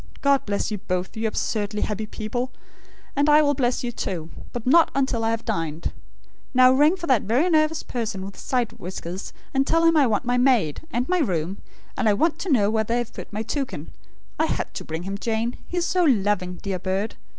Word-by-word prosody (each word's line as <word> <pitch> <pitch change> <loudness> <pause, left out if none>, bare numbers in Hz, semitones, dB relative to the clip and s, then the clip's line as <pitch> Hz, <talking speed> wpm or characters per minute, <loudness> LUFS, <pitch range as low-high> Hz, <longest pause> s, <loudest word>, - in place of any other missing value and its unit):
God 280 -3 +3
bless 205 +2 -1
you 210 - -2
both, 185 +3 -3
you 220 0 -1
absurdly 210 -1 -1
happy 215 0 -2
people; 245 +4 -3 0.6
and 285 +2 +3
I 300 +1 +7
will 290 -1 +3
bless 255 -2 0
you, 240 - -2
too; 170 -7 -4 0.2
but 240 -2 -6
not 325 +6 +6
until 265 -4 +1
I 225 - +2
have 230 0 -2
dined. 165 -6 -2 0.6
Now, 255 0 +7
ring 295 +6 +5
for 350 -2 -6
that 260 -8 +3
very 245 - +2
nervous 310 0 +2
person, 220 -6 -3
with 195 - -8
side 245 -3 -1
whiskers; 180 +1 -6 0.2
and 270 +1 +2
tell 330 0 +3
him 330 0 +5
I 290 -4 +5
want 220 +2 0
my 245 +1 +2
maid, 245 - +3
and 245 -5 -1
my 365 0 +2
room, 185 - -1 0.4
and 245 -4 +2
I - - +5
want 320 +6 +1
to 360 - -2
know 210 -6 +4
where 220 0 +2
they 230 +2 0
have 240 -2 -3
put - - -9
my 215 +1 -3
toucan. 245 - -4 0.5
I - - +4
had - - -3
to - - -5
bring 160 +2 -5
him, 195 +2 -4
Jane. 230 +2 -1
He 355 - -5
is 345 - +1
so 360 0 +2
LOVING, 205 - +2
dear 195 -2 -2
bird! 190 +4 -1
230 Hz, 215 wpm, -24 LUFS, 200-275 Hz, 0.6 s, I